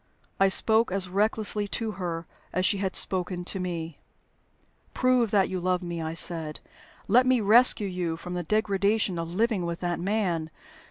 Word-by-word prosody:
I 195 - +5
spoke 220 +2 +2
as 190 -1 0
recklessly 210 +2 0
to 225 +2 -3
her 170 -4 -5 0.3
as 185 0 0
she 200 - +2
had 190 -1 -2
spoken 180 -1 +1
to 190 - -3
me. 170 -3 -5 1.0
"Prove 255 -3 +2
that 195 -2 +2
you 185 - -4
love 180 +1 -1
me," 170 -1 -5
I 160 0 -4
said. 160 -2 -3 0.5
"Let 250 +5 +4
me 255 -1 +3
rescue 220 0 +5
you 175 -3 -3
from 180 +2 -8
the 180 - -2
degradation 200 0 0
of 165 0 -4
living 210 +1 0
with 170 0 -4
that 175 -1 -2
man. 180 -5 -1
185 Hz, 170 wpm, -26 LUFS, 175-215 Hz, 1.0 s, I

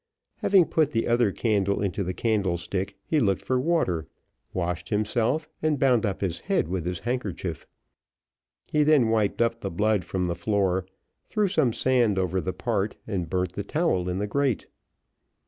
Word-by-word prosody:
Having 190 -3 +4
put 155 -2 +1
the 115 - +1
other 120 -3 +3
candle 100 -2 +1
into 100 0 -1
the 90 0 -3
candlestick, 95 -3 -1
he 155 - +1
looked 100 -6 +1
for 130 +5 +1
water, 125 - 0 0.4
washed 90 -1 -3
himself, 115 +8 0
and 155 -2 +1
bound 125 -4 +3
up 100 - -3
his 90 -4 -1
head - - 0
with 90 -1 -3
his 90 -1 -2
handkerchief. 95 - -4 1.0
He 150 - +1
then 145 -6 +4
wiped 110 0 +2
up 115 0 -1
the 100 - -2
blood 105 +2 +1
from 90 +2 -2
the 85 - 0
floor, 95 0 0 0.4
threw 210 -2 +1
some 155 -10 +2
sand 120 -4 +2
over 95 0 0
the 95 - -2
part, 105 -1 -1
and 90 -6 -3
burnt 90 0 -1
the 100 - -4
towel 100 - 0
in 90 - -2
the 100 - -1
grate. 135 +2 0
105 Hz, 170 wpm, -26 LUFS, 90-125 Hz, 1.0 s, Having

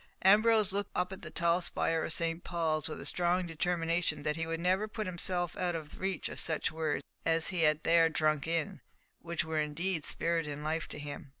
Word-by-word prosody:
Ambrose 215 +1 +5
looked 200 0 -1
up 180 +1 0
at 190 - -9
the 155 - -7
tall 170 +2 +2
spire 165 -2 0
of - - -2
St. 165 +1 -1
Paul's 160 -3 0
with - - -6
a - - -7
strong 180 +1 +1
determination 165 -2 -1
that 150 0 0
he 165 0 -3
would 165 0 -2
never 185 +4 +1
put 215 0 -4
himself 175 -1 0
out 180 -2 -1
of 155 -2 -7
reach 190 -1 -2
of - - -5
such 160 -2 +1
words 160 -1 -2 0.2
as 165 0 +2
he 180 -3 -1
had 155 -1 +3
there 165 0 +5
drunk 155 -2 +1
in, 165 +1 +1
and 195 - -12 0.4
which 170 -2 -2
were 160 -1 -1
indeed 160 +3 -2
spirit 165 0 -1
and 145 0 -5
life 160 +1 -1
to - - -7
him. 145 -1 -7
165 Hz, 215 wpm, -32 LUFS, 155-180 Hz, 0.4 s, Ambrose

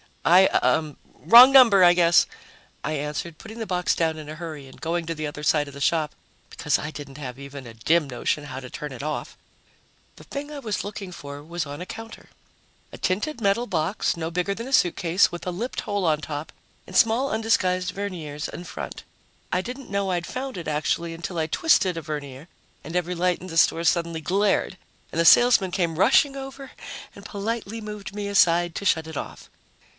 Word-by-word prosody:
"I 185 +3 +7
uh 155 -2 +1 0.2
wrong 245 +3 +8
number, 235 -8 +7
I 175 0 +8
guess," 170 -1 +5 0.6
I 155 - -2
answered, 150 +2 -4
putting 220 0 -10
the 225 - -4
box 180 -1 0
down 160 -1 0
in 150 -1 -9
a 155 - -6
hurry 155 -4 -7
and 130 - -15
going 170 +1 -2
to 165 0 -3
the 155 0 -4
other 145 0 -7
side 150 -1 +2
of 140 - -10
the 140 - -9
shop 155 0 +1 0.4
because - - 0
I 150 - -4
didn't 145 -3 -9
have 125 -3 -6
even 140 -1 -9
a 115 - -10
dim 155 +7 +2
notion 135 +3 -2
how 130 -2 -6
to 130 -1 -9
turn 150 +3 -6
it 125 - -8
off. 155 0 -4 0.8
The - - -13
thing 290 +1 -6
I 295 - -6
was 215 -7 -3
looking 200 -2 -7
for 145 -3 -9
was 170 +1 -4
on 145 +3 -7
a - - -5
counter 225 0 -10 0.6
a - - -9
tinted 215 +9 -1
metal 205 +4 +2
box 175 +1 0
no 165 -1 -3
bigger 180 +3 -1
than 230 +4 -6
a 270 - -6
suitcase, 175 -2 +3
with 175 - -7
a 180 - -2
lipped 230 +9 -4
hole 205 -3 -2
on 155 -2 +2
top 150 0 -6 0.4
and - - -10
small 240 +4 +4
undisguised 185 -4 +1
verniers 165 -7 -5
in 175 - -8
front. - - -7 0.5
I 180 - +1
didn't 250 +6 -8
know 200 -1 0
I'd 175 -1 -2
found 260 -3 -5
it, 170 - -6
actually, 160 +2 -1
until 170 +1 -6
I 160 - +1
twisted 185 - +2
a 165 - -4
vernier 145 -1 -7 0.4
and 160 +4 -8
every 180 0 -1
light 180 +1 +1
in 185 - -8
the 165 -2 -5
store 165 +1 +4
suddenly 170 -1 +1
glared 195 +2 +1 0.3
and 165 - -3
the - - +1
salesman 230 -2 +6
came 170 -3 -1
rushing 275 +7 +4
over 270 0 -8 0.4
and - - -12
politely 220 +1 -4
moved 210 -2 -7
me 205 -1 -3
aside 175 -3 +3
to 200 - -5
shut 160 -4 +2
it 160 -2 -7
off. - - -7
175 Hz, 205 wpm, -24 LUFS, 155-205 Hz, 0.8 s, wrong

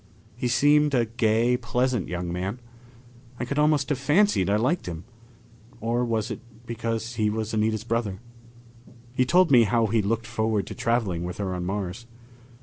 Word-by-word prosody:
He 125 +1 -2
seemed 145 +3 +4
a 120 -2 +3
gay, 115 +2 +2
pleasant 125 -3 -1
young 90 0 -4
man. 95 +7 -3 0.8
I 125 - -2
could 140 +4 -2
almost 150 -2 +2
have 145 -3 0
fancied 150 - +3
I 100 - +3
liked 130 - 0
him. 85 -1 -5 0.8
Or 120 +2 0
was 115 -1 -1
it - - -5 0.3
because 115 0 -3
he 105 -2 +2
was 110 +1 -3
Anita's 110 0 0
brother? 115 -4 -2 0.9
He 130 0 +2
told 175 +3 +4
me 120 -4 +7
how 115 +1 +2
he 110 +1 +1
looked 115 +3 -1
forward 110 -3 -1
to - - -7
traveling 110 -8 0
with 90 +1 -5
her 95 -2 -2
on 90 -1 -3
Mars. 100 +3 -4
115 Hz, 170 wpm, -25 LUFS, 105-125 Hz, 0.9 s, me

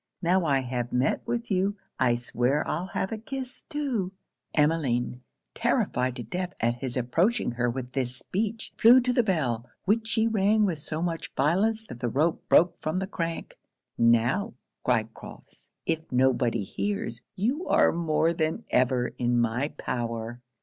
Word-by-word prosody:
Now 180 +1 +3
I 140 -3 +2
have 120 -1 -3
met 125 +2 +1
with 235 -1 -2
you 195 +2 +1 0.2
I 120 -2 +4
swear 120 +4 0
I'll 175 +4 -2
have 190 +1 -2
a 220 - -3
kiss 260 +2 -6
too.' 265 - -1 0.4
Emmeline, 140 -6 +1 0.3
terrified 125 0 0
to 125 - -5
death 180 - -4
at 115 +1 +2
his 130 -2 -3
approaching 165 - +1
her 120 0 0
with 125 +1 -4
this 125 -2 -2
speech, 220 - -3
flew 240 +3 +8
to 250 0 +1
the 245 - +4
bell, 135 - -1 0.2
which 220 +3 +2
she 225 -1 +2
rang 215 -1 +3
with 170 -6 -1
so 155 +2 -4
much 165 -2 -3
violence 205 +10 +2
that 120 - -9
the 120 -1 -1
rope 155 +7 0
broke 175 +2 +5
from 155 +3 -2
the 190 - 0
crank. 165 -4 -4 0.4
'Now,' 120 - +2 0.3
cried - - +1
Crofts, - - -12 0.2
'if 160 -1 -2
nobody 125 -3 +2
hears, 120 - -3
you 260 - -1
are - - +5
more 165 0 +1
than 160 -1 -1
ever 125 -1 +2
in 120 0 +2
my 120 +4 +1
power.' 115 0 -3
155 Hz, 165 wpm, -27 LUFS, 125-200 Hz, 0.4 s, flew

